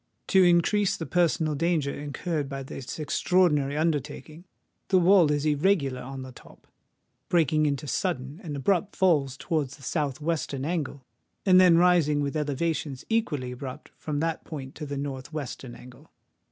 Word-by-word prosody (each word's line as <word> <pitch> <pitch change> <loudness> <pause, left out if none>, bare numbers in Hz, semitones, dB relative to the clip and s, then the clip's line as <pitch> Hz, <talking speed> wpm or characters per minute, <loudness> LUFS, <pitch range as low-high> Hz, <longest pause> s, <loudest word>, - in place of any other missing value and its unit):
To 190 -1 +6
increase 180 +3 +3
the 165 - -5
personal 165 -3 +1
danger 155 -2 0
incurred 145 +1 -3
by 135 -1 -5
this 135 -1 -7
extraordinary 150 -3 +1
undertaking, 155 +1 -2 0.4
the 190 - +3
wall 180 -2 +5
is 145 0 0
irregular 145 -4 +1
on 135 +1 -7
the 130 - -9
top, - - -17 0.6
breaking 155 -3 +3
into 145 +1 -2
sudden 145 0 -3
and 150 -4 -5
abrupt 190 +8 0
falls 145 -8 +2
towards 150 -5 -2
the 140 - -17
south 145 -2 -2
western 150 -4 -2
angle, 145 -5 -3 0.4
and 185 -1 +7
then 175 -2 +6
rising 170 -4 +4
with 145 +1 -2
elevations 150 -2 -2
equally 150 - -1
abrupt 130 +3 -8
from 150 -1 -3
that 165 0 -2
point 135 -4 -7
to 150 - -7
the 140 0 -4
north 140 0 -5
western 135 -4 -6
angle. 125 0 -15
150 Hz, 155 wpm, -27 LUFS, 140-170 Hz, 0.6 s, and